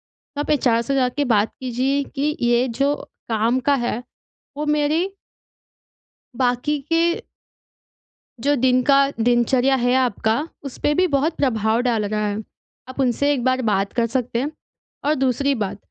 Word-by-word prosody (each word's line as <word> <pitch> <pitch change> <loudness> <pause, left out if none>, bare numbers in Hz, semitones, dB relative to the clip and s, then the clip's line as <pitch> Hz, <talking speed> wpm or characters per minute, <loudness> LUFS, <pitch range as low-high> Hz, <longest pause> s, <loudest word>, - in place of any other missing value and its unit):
तो 290 0 -8
आप - - -5
एचआर 245 -6 +2
से 275 +4 -2
जा 255 -2 +2
के 285 +3 -2
बात 220 -3 +2
कीजिए 260 +3 0
कि 295 +2 0
ये 240 +1 +3
जो 275 +4 0 0.3
काम 230 +3 +1
का 285 +2 +2
है, 240 -2 -2 0.5
वो 300 - -2
मेरी 300 +2 +1 1.3
बाकी 250 +4 0
के 330 0 +3 1.4
जो 285 +3 +2
दिन 255 -1 +3
का 275 +1 +4 0.2
दिनचर्या 245 +3 +3
है 245 -1 +1
आपका, 245 +2 +1 0.2
उसपे 285 +2 -1
भी 365 +5 +3
बहुत 295 +1 0
प्रभाव 225 -4 +1
डाल 235 -4 0
रहा 210 +1 -1
है। 205 +1 -3 0.5
आप 260 - -10
उनसे 270 +2 +2
एक 255 -4 -2
बार 255 0 +1
बात 200 -4 0
कर 235 - +1
सकते 240 -1 -1
हैं। 285 +4 -2 0.5
और 300 - +3
दूसरी 270 +1 +1
बात, 205 -5 -3
255 Hz, 160 wpm, -21 LUFS, 235-285 Hz, 1.4 s, का